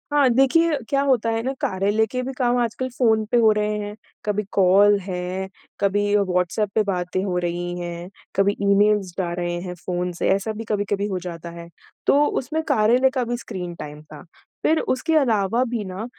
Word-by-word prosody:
हाँ 285 -3 +5
देखिए, 285 +6 +3
क्या 275 0 +2
होता 235 -3 +2
है 225 0 -1
ना, 260 - -1
कार्यालय 200 +4 +1
के 255 - -1
भी 265 +1 -4
काम 245 -1 +2
आजकल 240 +2 -2
फ़ोन 220 -3 +3
पे 245 - +4
हो 220 -2 +5
रहे 210 0 0
हैं। 205 0 -5 0.3
कभी 210 0 0
कॉल 200 +2 +5
है, 185 0 -4 0.3
कभी 205 +1 +1
व्हाट्सएप 185 +1 0
पे 220 - +4
बातें 185 -1 -2
हो 185 -3 -1
रही 175 +1 -3
हैं, 175 0 -6 0.3
कभी 200 +1 +2
ईमेल्स 200 -2 +3
जा 180 -3 -1
रहे 175 0 -2
हैं 180 -1 -6
फ़ोन 180 0 -2
से, - - +1
ऐसा 195 +3 +1
भी 220 +1 -6
कभी-कभी 205 -1 -1
हो 190 -3 -2
जाता 170 -2 -7
है। 170 0 -10 0.4
तो 285 +1 +5
उसमें 305 +3 -1
कार्यालय 240 +5 +4
का 260 -1 -1
भी 240 0 -2
स्क्रीन 180 -7 -6
टाइम 150 -1 -8
था। 155 +2 -13 0.4
फिर 320 0 +3
उसके 320 +5 0
अलावा 230 -4 +2
भी 230 -2 -3
ना 190 +3 -5
205 Hz, 195 wpm, -22 LUFS, 180-235 Hz, 0.4 s, हाँ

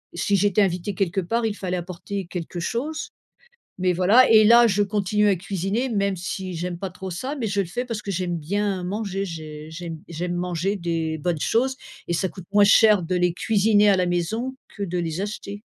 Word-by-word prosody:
si 200 +4 +1
j'étais 205 +2 +3
invitée 180 +1 -2
quelque 190 0 0
part, 230 +6 -1
il 210 -2 -1
fallait 185 -2 -3
apporter 180 +2 -5
quelque 175 -1 -5
chose, 275 - -3 0.7
mais 180 0 +2
voilà. 210 +9 +5
Et 215 -1 +7
là, 235 +2 +7
je 205 -1 +2
continue 210 +1 +1
à 195 - +3
cuisiner 195 +7 -2
même 200 -4 0
si 185 +1 -5
j'aime 175 +1 -4
pas 195 -1 -4
trop 190 +1 -7
ça, 260 - -4
mais 235 -5 -2
je 200 -1 0
le 190 - -1
fais 245 +9 -4
parce 225 -3 -4
que 200 - -5
j'aime 175 -2 -2
bien 195 +3 -1
manger, 195 0 -3
j'ai 155 -2 -8
j'aime 165 -1 -6
j'aime 175 +2 -3
manger 180 +3 -1
des 165 -3 -2
bonnes 165 0 -1
choses 260 +3 +1 0.3
et - - 0
ça 190 +2 0
coûte 185 -3 -11
moins 205 0 +6
cher 210 -2 +6
de 180 +2 -2
les 180 -1 +2
cuisiner 210 0 +3
à 195 - +4
la 180 - +2
maison 220 +9 -1 0.2
que 205 - -5
de 180 -1 -3
les 165 +1 -2
acheter. 205 0 -6
190 Hz, 210 wpm, -23 LUFS, 175-210 Hz, 0.7 s, Et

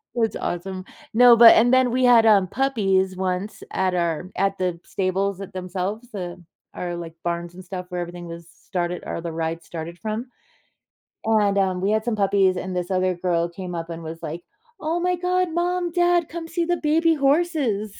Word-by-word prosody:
That's 225 -2 0
awesome. 185 +2 -4 0.3
No, 245 +1 +8
but 230 0 +9
and 240 +2 +4
then 255 -1 +4
we 255 +1 +2
had, 235 -2 +6
um, 200 -4 +5
puppies 195 -6 +1
once 185 +2 -3
at 190 -1 +1
our 170 0 -1
at 195 +1 +1
the 180 -2 -2
stables 195 +1 -1
at 195 -1 -8
themselves, 190 +6 -5
uh, 175 -3 -5 0.4
our, 175 -1 -4
like, 170 -1 -7
barns 170 0 -3
and 185 +1 -11
stuff 180 0 -6
where 180 -1 -3
everything 175 0 -7
was 170 0 -9
started 175 -1 -4
or - - -4
the 170 0 -4
ride 165 +1 -3
started 170 +1 -7
from. 220 +3 -4 1.0
And, 210 -3 +2
um, 185 -2 +1
we 195 +2 +1
had 220 0 0
some 240 -2 0
puppies, 195 -2 +3
and 185 0 -4
this 180 0 -2
other 185 -1 +1
girl 175 -1 0
came 180 0 -7
up 165 0 -5
and 165 0 -6
was 160 +1 -7
like, 165 +3 -5 0.4
"Oh 325 +3 -1
my 360 +1 +1
god. 360 0 0
Mom, 350 0 0
dad, 350 -1 +2
come 330 0 -6
see 335 +1 -1
the 350 +1 0
baby 325 +1 +2
horses." 275 - +1
195 Hz, 195 wpm, -23 LUFS, 175-245 Hz, 1.0 s, but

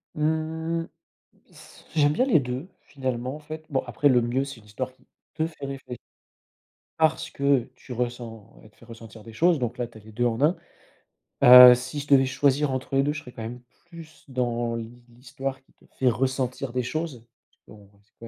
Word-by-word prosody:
Mmh 160 +2 -1 0.6
ce - - -17 0.2
j'aime 145 0 +4
bien 255 - +2
les 235 - +4
2 130 +7 -5
finalement, 130 -1 -4
en - - -9
fait. 155 +1 -9
Bon, 135 -2 -1
après 125 +4 +1
le 125 -2 +4
mieux 125 +4 -1
c'est 140 -3 -9
une 105 - -20
histoire 130 +5 -5
qui - - -29 0.3
te 160 0 -1
fait 155 -4 -9
réfléch 135 -2 -7 1.0
parce 160 0 +2
que 140 -3 +1
tu 125 - -9
ressens 115 - -6
elle - - -16
te - - -32
fait - - -19
ressentir 115 -1 -12
des 115 - -11
choses, 170 +5 +3
donc 120 0 -3
là, 120 -1 -2
tu 115 - -16
as 110 - -14
les 110 +1 -15
2 120 +3 -1
en 120 +2 -1
1, 160 +5 +4 0.9
heu, 125 0 +11
si 125 +4 -5
je 145 - -7
devais 135 -2 +5
choisir 140 +1 +1
entre 130 +1 -3
les 135 - +4
2, 145 - 0
je 155 - -5
serais 125 -4 -13
quand 115 - -9
même 120 +2 -7 0.3
plus 165 -2 -13
dans 120 -2 -1
l'hi 115 +1 -8
l'histoire 130 +2 -6
qui - - -31
te - - -29 0.2
fait 130 - +2
ressentir 130 +1 -2
des 125 0 -1
choses, 150 -4 -4 0.3
parce - - -39 0.2
qu'on 100 -1 -18
reste 100 +1 -33
quand 115 - -10
130 Hz, 210 wpm, -25 LUFS, 120-145 Hz, 1.0 s, heu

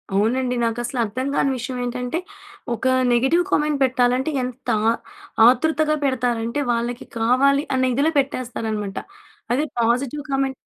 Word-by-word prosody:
అవునండి 250 +5 +1
నాకసలర్థం 240 +1 -2
కాని 275 - +2
విషయం 250 +1 -5
ఏంటంటే 250 +5 -3 0.6
ఒక 230 - -7 0.3
నెగిటివ్ 265 +9 +3
కామెంట్ 300 -1 +1
పెట్టాలంటే 255 +1 +2
ఎంత 250 +1 -7 0.8
ఆతృతగా 305 +4 +3
పెడతారంటే, 245 -1 0
వాళ్ళకి 235 +1 -2
కావాలి 265 +5 +3
అనే 260 0 +2
ఇదిలో 285 +5 +2
పెట్టేస్తారనమాట. 225 -6 -3 0.6
అదే 295 +5 +1 0.2
పాజిటివ్ 250 +5 0
కామెంట్... 270 0 0
255 Hz, 110 wpm, -22 LUFS, 235-275 Hz, 0.8 s, నెగిటివ్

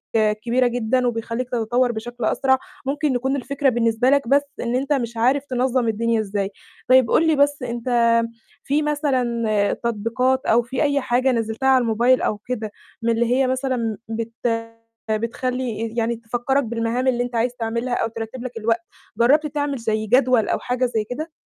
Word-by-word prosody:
كبيرة 225 +4 +2
جدًا 245 +1 0
وبيخليك 235 +2 -3
تتطور 245 +1 +1
بشكل 240 +1 -5
أسرع. 265 +1 +2 0.3
ممكن 285 0 0
يكون 265 +3 0
الفكرة 280 +1 0
بالنسبة 235 0 +2
لك 280 -3 +2
بس 280 +2 +4 0.2
إن 240 +1 -1
أنت 275 +3 0
مش 235 -4 -2
عارف 265 +5 +2
تنظّم 255 -1 0
الدنيا 230 +1 +1
إزاي. 200 -2 -2 0.4
طيب 255 -2 +5
قل 325 - +4
لي 315 - +4
بس 285 -1 +2
أنت 240 0 -4 0.7
في 290 +2 +1
مثلًا، 265 -6 0 0.4
تطبيقات 235 +4 0
أو 235 +2 +4
في 250 +4 -2
أي 285 -1 +1
حاجة 255 +1 +2
نزلتها 225 +2 -1
على 260 -1 +5
الموبايل 240 +2 +3
أو 210 - 0
كده 220 0 -5 0.3
من 230 - 0
اللي 230 +1 +1
هي 265 0 +2
مثلًا 255 -4 -1
بت 225 +1 -4 0.8
بتخلي 230 0 -2
يعني 235 0 +1
تفكرَك 245 +4 -1
بالمهام 235 +2 -1
اللي 245 -1 +2
أنت 245 0 -6
عايز 240 +2 0
تعملها 235 +1 -2
أو - - 0
ترَتِب 230 +2 -7
لك 250 -2 -6
الوقت؟ 225 +1 0 0.4
جربت 285 +7 +4
تعمل 290 -1 -2
زَي 220 -2 -1
جدول 250 -1 +3
أو - - 0
حاجة 250 +1 -1
زَي 230 -3 -1
كده؟ 305 +9 -6
245 Hz, 170 wpm, -22 LUFS, 230-260 Hz, 0.8 s, طيب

